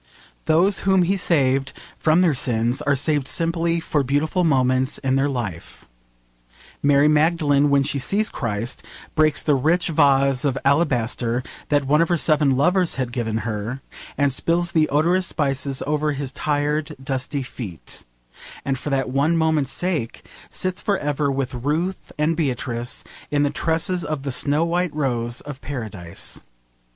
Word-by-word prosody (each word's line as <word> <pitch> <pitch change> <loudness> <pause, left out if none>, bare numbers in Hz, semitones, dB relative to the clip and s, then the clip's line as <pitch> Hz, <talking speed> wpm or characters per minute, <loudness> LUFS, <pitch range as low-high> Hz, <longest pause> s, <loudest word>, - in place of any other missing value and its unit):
Those 180 +5 +3
whom 190 -1 +3
he 190 +3 +1
saved 135 -7 +1 0.3
from 160 +3 +3
their 170 -4 +3
sins 120 0 0
are 145 -1 +2
saved 145 0 0
simply 165 +1 0
for 155 -2 0
beautiful 145 +7 0
moments 130 -3 +2
in 135 -2 -1
their 135 +1 +2
lives. 90 - -5 1.0
Mary 145 0 +4
Magdalen, 150 -2 +3
when 140 -1 +4
she 140 +1 -1
sees 205 +10 0
Christ, 115 0 -4 0.3
breaks 155 -1 +3
the 150 - +3
rich 160 +7 +1
vase 140 -3 +3
of 135 -2 0
alabaster 125 -5 +1 0.3
that 145 -1 +2
one 150 +4 +3
of 170 - +2
her 175 - +2
seven 150 -4 +3
lovers 180 +4 +3
had 130 -3 -2
given 115 -3 -2
her, 110 +4 -4 0.4
and 145 -2 +2
spills 170 +4 0
the 155 -2 +2
odorous 170 +6 +2
spices 135 -2 -1
over 150 +1 0
his 140 -1 -4
tired 145 +1 -1
dusty 135 +1 -3
feet, 105 - -9 0.6
and 135 -1 -1
for 150 - -5
that 135 -1 0
one 145 +5 +2
moment's 160 -4 +1
sake 170 -10 -3 0.3
sits 185 +2 -3
for 205 -3 +1
ever 145 -2 -1
with 135 -1 -2
Ruth 155 +9 -2
and 155 +2 +1
Beatrice 125 -5 -3 0.3
in 145 0 +1
the 145 - +1
tresses 165 +3 -1
of 150 -2 -4
the 140 - -3
snow 145 +5 +1
white 175 -1 -1
rose 120 -5 -2
of 145 -2 -9
Paradise. 105 -10 -5
145 Hz, 155 wpm, -22 LUFS, 130-160 Hz, 1.0 s, Mary